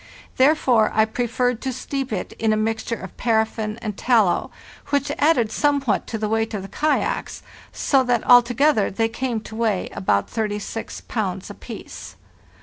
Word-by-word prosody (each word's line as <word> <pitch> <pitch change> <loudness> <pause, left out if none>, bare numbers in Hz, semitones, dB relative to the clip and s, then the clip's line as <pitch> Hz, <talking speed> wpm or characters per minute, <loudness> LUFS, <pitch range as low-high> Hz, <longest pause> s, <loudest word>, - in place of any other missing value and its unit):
Therefore 260 -5 +4
I 220 0 +5
preferred 245 +1 -1
to 265 - -2
steep 270 +1 -4
it 195 -4 -3
in 220 -1 +2
a 215 - +2
mixture 225 +2 -1
of 190 -4 -10
paraffin 220 -2 0
and 210 -3 -3
tallow, 220 -7 +2 0.4
which 285 -1 0
added 285 -8 +3
somewhat 280 -6 +1
to 225 - -3
the 215 0 -2
weight 225 +1 -1
of 195 - -4
the - - -7
kayaks, 305 0 -1 0.3
so 270 -2 +2
that 245 -2 +1
altogether 245 0 +5
they 225 +3 0
came 240 -1 -2
to 220 - -10
weigh 220 -5 0
about 100 +1 0
36 210 -2 -4
pounds - - -3
apiece. - - -9
225 Hz, 155 wpm, -22 LUFS, 215-255 Hz, 0.4 s, I